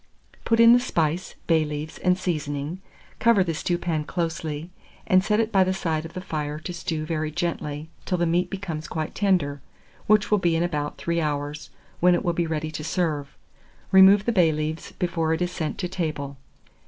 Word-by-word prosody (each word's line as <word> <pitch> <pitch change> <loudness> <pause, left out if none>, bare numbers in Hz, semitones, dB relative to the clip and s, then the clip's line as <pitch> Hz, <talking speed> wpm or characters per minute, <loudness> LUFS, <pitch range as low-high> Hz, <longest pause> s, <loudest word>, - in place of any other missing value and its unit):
Put 230 0 +2
in 230 0 +9
the 245 - +6
spice, 170 - -1
bay 160 -2 +3
leaves, 150 +1 -5
and 180 0 +2
seasoning, 155 -1 -3 0.4
cover 230 -4 +5
the 170 -2 -2
stewpan 170 -1 -1
closely, 165 -1 -3 0.3
and 185 0 +4
set 210 +1 +2
it 225 0 +1
by 195 -3 +5
the 185 0 0
side 160 -4 -1
of 165 - -9
the 185 - -5
fire 150 -4 -3
to 160 +3 -6
stew 160 -2 -3
very 155 -1 -2
gently, 155 -2 -3 0.2
till 180 - 0
the 175 - +1
meat 175 +2 +1
becomes 175 -6 -5
quite 155 -2 -4
tender, 175 -9 +1 0.5
which 210 0 +3
will 210 - +4
be 170 -2 +2
in 165 - +1
about 150 -4 -2
3 170 0 -1
hours, 145 0 -3 0.3
when 180 0 +5
it - - -2
will 175 - +2
be 170 0 0
ready 155 -1 -2
to 155 0 -5
serve. 150 -4 -2 0.5
Remove 195 +2 +7
the 235 - +2
bay 180 -7 +4
leaves 155 +1 -3
before 165 -2 0
it 160 - -6
is 175 - -2
sent 160 -4 -3
to 180 - -2
table. 155 -6 -3
165 Hz, 195 wpm, -25 LUFS, 155-185 Hz, 0.5 s, in